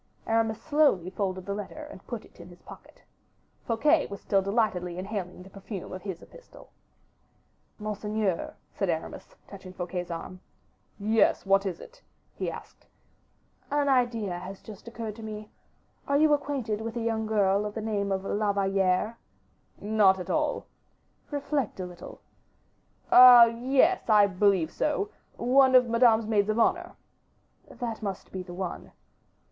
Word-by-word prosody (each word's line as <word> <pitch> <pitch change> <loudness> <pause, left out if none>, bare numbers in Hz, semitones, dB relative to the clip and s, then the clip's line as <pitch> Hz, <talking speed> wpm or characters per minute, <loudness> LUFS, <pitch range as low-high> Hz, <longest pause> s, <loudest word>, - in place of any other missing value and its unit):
Aramis 225 0 0
slowly 275 - +2
folded 185 -2 -3
the 200 - -3
letter 210 +9 -7
and - - -14
put 235 -3 -6
it - - -22
in 170 +1 -11
his 175 - -17
pocket. - - -15 0.6
Fouquet 290 +7 +2
was 200 - -8
still 195 -1 +1
delightedly 195 -4 -1
inhaling 185 -2 -5
the 190 - -14
perfume 195 -1 -8
of 185 - -7
his 190 -4 -7
epistle. - - -16 1.1
"Monseigneur," 210 -3 -3 0.2
said 195 - -2
Aramis, 160 -1 -5
touching 190 -2 -11
Fouquet's 180 0 -5
arm. 175 +2 -7 0.6
"Yes, 215 +1 +2
what 195 +1 +3
is 175 -3 -4
it?" - - -14 0.3
he - - -3
asked. - - -11 0.8
"An 290 0 +1
idea 230 -8 +1
has 190 +2 -9
just 215 +1 -12
occurred 230 -2 -6
to - - -9
me. 215 -1 -8 0.6
Are 280 - +2
you 305 0 +4
acquainted 270 -7 -2
with 225 +1 -5
a - - -2
young 225 -1 -1
girl 200 -2 +2
of 210 0 -5
the - - -3
name 205 -2 -1
of 190 0 -1
La 205 0 0
Valliere? 195 +2 0 0.6
"Not 205 -3 +3
at 180 - -5
all." 305 -2 -1 0.6
"Reflect 285 -6 -2
a 185 - -3
little." 180 -1 -11 0.9
"Ah! 250 -1 +10
yes, 260 +9 +1
I 210 -2 +6
believe 190 -4 +1
so; 355 +7 -1 0.3
one 260 +2 +4
of 250 -1 +6
Madame's 230 -1 +4
maids 210 -1 +1
of 215 - 0
honor." 230 - +1 0.8
"That 230 -2 -5
must 195 -3 -5
be 190 - -5
the 175 -1 -9
one." 185 -1 -6
210 Hz, 150 wpm, -27 LUFS, 190-235 Hz, 1.1 s, Ah